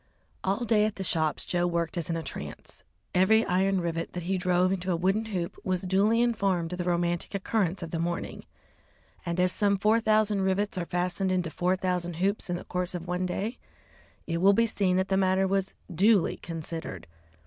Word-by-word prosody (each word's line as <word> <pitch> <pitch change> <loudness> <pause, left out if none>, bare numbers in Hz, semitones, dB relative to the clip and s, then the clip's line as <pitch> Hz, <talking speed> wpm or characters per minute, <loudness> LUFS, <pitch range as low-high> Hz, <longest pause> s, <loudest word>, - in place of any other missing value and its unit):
All 200 +6 0
day 215 -2 +3
at 215 - -2
the 195 - -4
shops 160 -4 +1
Joe 175 0 0
worked 170 -2 -1
as 170 -2 -3
in 165 - 0
a 165 - -4
trance. - - -8 0.3
Every 220 +5 +4
iron 190 +1 +2
rivet 165 -1 -3
that 180 - -4
he 190 +3 -1
drove 180 0 +2
into 185 -1 -1
a - - +2
wooden 190 +6 +1
hoop 185 -6 -4
was 185 -1 -1
duly 205 +5 +3
informed 195 -8 0
of 180 - -5
the 175 - -2
romantic 175 +1 0
occurrence 195 -2 -1
of 165 - -7
the 165 - -2
morning, 170 +1 -3 0.8
and 170 +1 -1
as 180 0 +3
some 200 +1 +2
four 215 +3 +3
thousand 215 -2 +2
rivets 190 +2 0
are 175 -2 -3
fastened 180 +2 0
into 180 -3 0
four 180 +4 +1
thousand 180 -2 -2
hoops 195 +3 -1
in 175 - 0
the 175 - -6
course 180 0 -2
of 175 0 -6
one 180 +1 -1
day, 210 +7 -3 0.7
it 165 - -2
will 195 +4 +5
be 230 +3 +3
seen 195 -4 +1
that 190 +1 0
the 190 - +2
matter 190 0 +3
was 195 0 -1 0.2
duly 200 +2 +3
considered. 165 - -6
185 Hz, 205 wpm, -28 LUFS, 175-195 Hz, 0.8 s, will